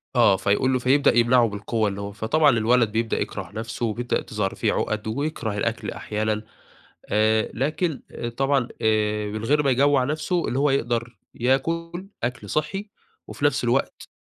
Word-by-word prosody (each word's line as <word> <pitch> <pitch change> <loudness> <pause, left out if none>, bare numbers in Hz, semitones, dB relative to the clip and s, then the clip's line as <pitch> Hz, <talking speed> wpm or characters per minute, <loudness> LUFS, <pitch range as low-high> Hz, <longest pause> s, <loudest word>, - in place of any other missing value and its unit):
آه 95 - +5
فيقول 100 +7 +1
له، 130 - +2
فيبدأ 135 +1 +3
يمنعه 120 0 +5
بالقوّة، 105 +1 -1
اللي 100 +1 -5
هو 100 - -5
فطبعًا 145 +9 +2
الولد 115 -1 +3
بيبدأ 115 +1 -1
يكره - - -5
نفسه 115 +2 -4
وبيبدأ 120 +2 -1
تظهر 105 -3 -3
فيه - - 0
عُقَد 110 0 -2
ويكره 115 -4 -2
الأكل 115 +2 -2
أحيانًا، 110 0 -2 0.7
آآ 110 +1 +2
لكن، 150 +4 -1 0.4
طبعًا 135 -2 +2
آآ 105 -1 +1
من 110 +1 -5
غير 150 +4 +2
ما 135 - +3
يجوع 140 +1 +3
نفسه؛ 150 +6 -3 0.2
اللي 130 - -1
هو 145 0 +3
يقدر 120 -3 -1 0.2
ياكل 165 +9 -1 0.2
أكل 125 +2 -3
صحّي، 195 +7 -2 0.4
وفي - - -3
نفس - - +2
الوقت - - -1
120 Hz, 160 wpm, -24 LUFS, 110-140 Hz, 0.7 s, آه